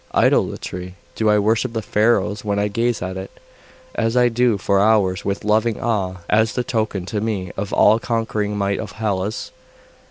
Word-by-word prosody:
'Idolatry? 90 0 0 0.2
Do 110 -1 +1
I 105 - +4
worship 115 +4 +1
the 110 -2 -2
Pharos 105 -1 +1
when 100 -1 -1
I 105 +1 +1
gaze 115 0 -1
at 95 +1 -4
it, 95 +1 -9 0.5
as 115 +1 0
I 125 0 +5
do 120 -2 +2
for 100 +1 +1
hours, 100 -3 +2
with 100 0 -2
loving 110 +1 +1
awe, 95 -6 -1
as 110 0 +2
the 125 - -1
token 110 -6 -2
to 105 +2 -3
me 100 -5 -2
of 100 +1 -3
the - - -3
all 110 +2 +5
conquering 110 -3 -2
might 100 0 0
of 105 -2 -6
Hellas? 105 -1 -2
105 Hz, 185 wpm, -20 LUFS, 100-115 Hz, 0.5 s, I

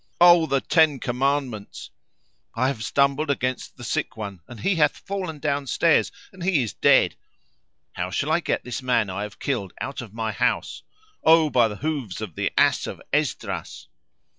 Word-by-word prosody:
O 175 -2 +7
the 135 -2 +1
Ten 155 -5 +3
Commandments! 125 -4 -2 0.6
I 130 +3 +2
have 115 -6 -4
stumbled 140 +3 +1
against 130 -2 -2
the 120 - -10
sick 110 - -2
one 100 -5 -6
and 120 - -11
he 190 -3 +1
hath 150 -2 +3
fallen 185 -5 -5
downstairs 145 +2 +1 0.2
and 190 - -13
he 170 -7 +2
is 110 - -5
dead! - - +4 0.8
How - - -4
shall - - -1
I - - +3
get - - -2
this 125 +3 -5
man 115 -6 +1
I 95 +2 -4
have 105 -1 -6
killed 105 -10 -3
out 140 - -4
of 115 -4 -10
my 110 0 -3
house? - - -1 0.4
O 160 -2 +5
by 120 -3 +4
the 105 - -6
hoofs 140 -5 -3
of 105 -6 -6
the - - -2
ass - - +3
of - - -7
Esdras!" - - -2
135 Hz, 175 wpm, -24 LUFS, 110-155 Hz, 0.8 s, O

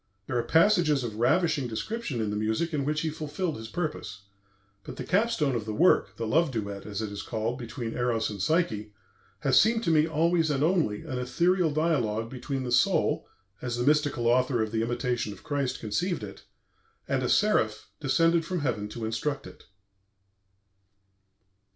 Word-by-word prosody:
There 120 - -4
are 120 - +2
passages 165 -5 +3
of 110 -3 -5
ravishing 155 +2 +2
description 140 - -3
in 105 -1 -1
the - - -2
music 110 +11 -1
in 140 -2 0
which 150 +1 0
he 160 - -1
fulfilled 155 +3 -3
his 110 0 -7
purpose. 150 - -4 0.6
But - - -8
the - - -5
capstone 185 - +1
of 115 -3 -2
the 110 -1 -4
work, 175 +8 +3
the 115 - -3
love 160 +8 +2
duet, 100 -5 -5
as 105 +1 -3
it 105 - -4
is 100 0 -5
called, 115 +2 -3
between 120 -1 -5
Eros 120 -2 0
and 100 -2 -6
Psyche, 110 - 0 0.5
has 130 -2 +5
seemed 225 +4 +3
to 170 - +2
me 155 0 +4
always 165 +1 +2
and 145 -1 +1
only 160 - +1
an 130 -6 -4
ethereal 175 +7 +2
dialogue 120 -9 0
between 135 +1 -4
the 125 - -4
soul 120 0 +2 0.3
as 120 -1 -3
the 120 - -1
mystical 145 -4 +2
author 125 0 +3
of 110 - -4
'The 110 0 0
Imitation 120 -1 -1
of - - -15
Christ' 140 -3 -1
conceived 175 - -2
it - - -9 0.6
and - - 0
a - - -1
seraph 110 - +2
descended 165 +4 +3
from 175 0 -3
heaven 105 -7 -2
to 110 +1 -5
instruct 135 +6 -2
it." - - -13
130 Hz, 180 wpm, -28 LUFS, 110-160 Hz, 0.6 s, has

